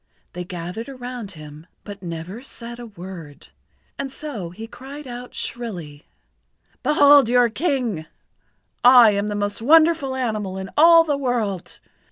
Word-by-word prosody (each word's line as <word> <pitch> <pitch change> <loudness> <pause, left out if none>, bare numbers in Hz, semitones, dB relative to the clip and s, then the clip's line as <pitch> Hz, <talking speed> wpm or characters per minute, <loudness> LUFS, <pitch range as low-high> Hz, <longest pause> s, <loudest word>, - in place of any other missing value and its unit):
They 180 - -5
gathered 180 +7 -6
around 245 -5 -7
him, 155 0 -12 0.2
but 205 -1 -9
said 180 -3 -7
never 170 +7 -7 0.4
a 240 - -7
word. 175 -7 -11 0.5
And 275 -1 -4
so 265 - -6
he 210 +6 -9
cried 275 +5 -10
out 245 0 -9
shrilly: 175 -11 -6 0.7
"Behold 285 -4 +6
your 245 -1 +4
King! 245 - -2 0.8
I 245 -3 +8
am 200 0 -1
the 210 - -3
most 205 +1 -2
wonderful 310 0 +4
animal 215 -7 -2
in 190 0 -6
all 330 +2 +7
the 295 -3 -1
world. 235 -9 -2
225 Hz, 140 wpm, -22 LUFS, 185-265 Hz, 0.8 s, I